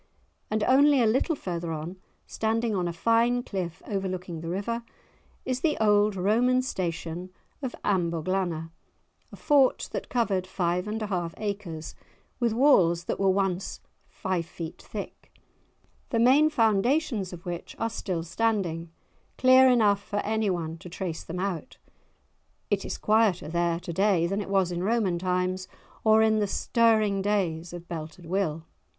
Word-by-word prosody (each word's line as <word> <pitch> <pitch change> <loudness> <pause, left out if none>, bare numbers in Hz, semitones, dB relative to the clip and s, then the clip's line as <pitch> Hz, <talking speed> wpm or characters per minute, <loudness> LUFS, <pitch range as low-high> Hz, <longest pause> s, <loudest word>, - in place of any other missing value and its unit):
And 215 0 0
only 280 +3 +5
a 235 - +4
little 260 +9 +2
further 175 - -4
on, 160 +4 -5 0.3
standing 225 +1 -1
on 180 -2 0
a - - -1
fine 230 +7 +2
cliff 180 -7 -5
overlooking 185 -4 -4
the 165 - -5
river, 205 +6 -2 0.6
is 255 -1 -1
the 310 -1 +1
old 210 -1 +3
Roman 240 +7 +2
station 175 -4 -4 0.3
of 260 -3 -4
Amboglanna, 170 -2 -1 0.6
a - - -9
fort 280 -3 +3
that - - -5
covered 200 -7 0
five 180 0 -1
and 215 +1 -3
a - - -1
half 175 -5 -3
acres, 200 -7 -5 0.5
with 240 -2 +2
walls 195 - +4
that - - -3
were 195 -1 +3
once 190 -1 -1 0.3
five 185 -3 -3
feet 165 -1 -8
thick, - - -8 0.8
the 230 - 0
main 265 +7 +5
foundations 230 - +1
of 175 -2 -10
which 175 -1 -6
are 225 - 0
still 180 -6 -3
standing, 175 -3 -1 0.5
clear 260 0 +7
enough 210 -5 +4
for 205 - -5
anyone 185 -7 -1
to 180 - -10
trace 175 -2 -5
them 175 +2 -6
out. 185 -3 -4 0.9
It - - +1
is - - -4
quieter 215 -7 +2
there 170 0 0
to 170 -1 -6
day 190 -2 +3
than 195 +4 -1
it 200 - -7
was 190 -2 +2
in 175 0 -3
Roman 200 -4 +1
times, 185 +1 -1 0.4
or 220 0 +5
in 220 -1 +3
the 205 - +1
stirring 215 -2 +2
days 180 -5 -1
of 175 0 -9
Belted 165 +1 -7
Will! 165 -3 -1
195 Hz, 155 wpm, -27 LUFS, 175-225 Hz, 0.9 s, clear